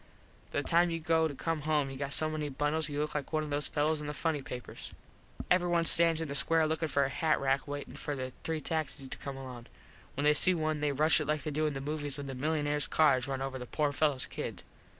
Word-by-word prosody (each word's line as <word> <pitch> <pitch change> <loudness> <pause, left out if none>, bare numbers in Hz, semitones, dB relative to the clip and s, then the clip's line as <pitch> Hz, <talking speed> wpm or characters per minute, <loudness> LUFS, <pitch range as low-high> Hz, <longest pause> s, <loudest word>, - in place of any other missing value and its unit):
By 145 - 0
the - - -8
time 170 +1 +4
you 165 0 -2
go 160 0 +2
to 145 - -7
come 165 +2 -2
home 150 -2 0
you - - -7
got 140 0 -3
so 155 - +4
many 155 -1 -3
bundles 150 +3 -1
you 145 0 -3
look 150 0 -1
like 145 -2 -4
one 155 -1 0
of 150 - -6
those 145 0 +2
fellos 150 +1 0
in 150 - -5
the 150 - -4
Funny 155 -1 -1
Papers. 125 -2 -8 0.6
Everyone 175 -2 +3
stands 165 -1 +4
in 160 - -2
the 140 - -4
square 160 +3 +4
lookin 160 0 -1
like 140 -1 +4
a - - -2
hat 155 +2 +1
rack 135 +1 0
waitin 145 0 -6
for 145 - -4
the 130 -1 -5
three 160 -1 -2
taxis 155 -4 -2
to - - -6
come 140 -1 -6
along. 125 -3 -9 0.5
When 140 - -2
they 150 0 +5
see 180 +4 +4
one 155 -2 -1
they 150 -1 +1
rush 150 +2 +4
it 150 - -3
like 150 -2 0
they 155 - -3
do 155 +1 0
in 150 - -3
the 135 - -4
movies 145 -1 -3
when 145 - -5
the 135 - -5
milunares 150 +1 0
cars 140 -4 +3
runs 135 -1 -2
over 135 -1 -4
the 125 - -7
poor 150 +2 0
fellos 145 -2 +1
kid. - - -6
150 Hz, 260 wpm, -31 LUFS, 140-155 Hz, 0.6 s, they